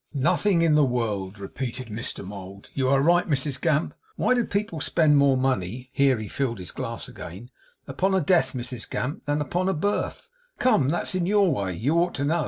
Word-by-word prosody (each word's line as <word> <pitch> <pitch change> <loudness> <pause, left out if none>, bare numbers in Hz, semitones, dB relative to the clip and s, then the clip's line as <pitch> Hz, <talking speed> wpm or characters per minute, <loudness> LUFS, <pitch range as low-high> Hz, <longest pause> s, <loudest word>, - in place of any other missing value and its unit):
'Nothing 170 +5 +2
in 165 -2 +4
the 150 0 +5
world,' 110 -6 -1
repeated 120 +5 -6
Mr 110 -2 -3
Mould. 100 0 -9
'You 130 -2 0
are 135 0 +3
right, 175 +3 +4
Mrs 140 -2 -1
Gamp. 155 -1 +1 0.2
Why - - +2
do 245 -1 +2
people 200 -7 -2
spend 155 -2 +3
more 140 -2 +4
money' 125 -1 -1
here 135 -2 +3
he 110 -1 -5
filled 120 0 -2
his 90 -2 -7
glass - - -5
again 105 +9 -10 0.4
'upon 190 +1 0
a - - +4
death, 175 +1 +2
Mrs 125 -2 -5
Gamp, 140 +4 -3
than 145 +1 +1
upon 180 +5 0
a 190 - 0
birth? 205 - -2 0.3
Come, 150 - +3
that's 175 +4 -1
in 180 -2 0
your 200 -3 +3
way; 95 -3 -2
you 140 - +1
ought 175 +1 +1
to 140 - -1
know. 165 +4 +1
140 Hz, 200 wpm, -25 LUFS, 120-170 Hz, 0.4 s, the